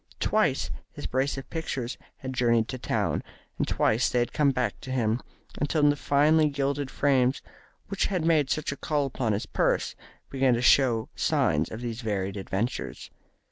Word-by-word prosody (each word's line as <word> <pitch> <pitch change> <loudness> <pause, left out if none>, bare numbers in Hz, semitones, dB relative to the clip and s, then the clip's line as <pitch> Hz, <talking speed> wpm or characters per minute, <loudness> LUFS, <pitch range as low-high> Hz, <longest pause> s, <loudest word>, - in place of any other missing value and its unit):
Twice - - +1 0.2
his - - -8
brace 135 +2 0
of 135 -1 -7
pictures 135 -7 -3 0.2
had 130 -1 -6
journeyed 115 -3 +2
to 130 - -4
town, - - -1 0.4
and - - +1
twice 115 +3 +2
they - - -1
had 120 -1 0
come 150 -2 +3
back 125 -5 -1
to - - -9
him, 120 -2 0 0.4
until 145 +1 +1
the 145 - +4
finely 150 +2 +3
gilded 140 0 -1
frames 135 -2 +2 0.4
which 200 - 0
had 180 -5 -1
made 155 -5 +3
such 155 -1 -1
a 140 - -6
call 145 -2 0
upon 125 -4 -1
his 100 - -2
purse - - 0 0.4
began 135 -2 +3
to 120 - -1
show 125 -4 +4
signs 75 +1 +1
of 110 - -7
these 120 0 -4
varied 100 -3 -2
adventures. 100 +4 -3
130 Hz, 175 wpm, -27 LUFS, 115-145 Hz, 0.4 s, the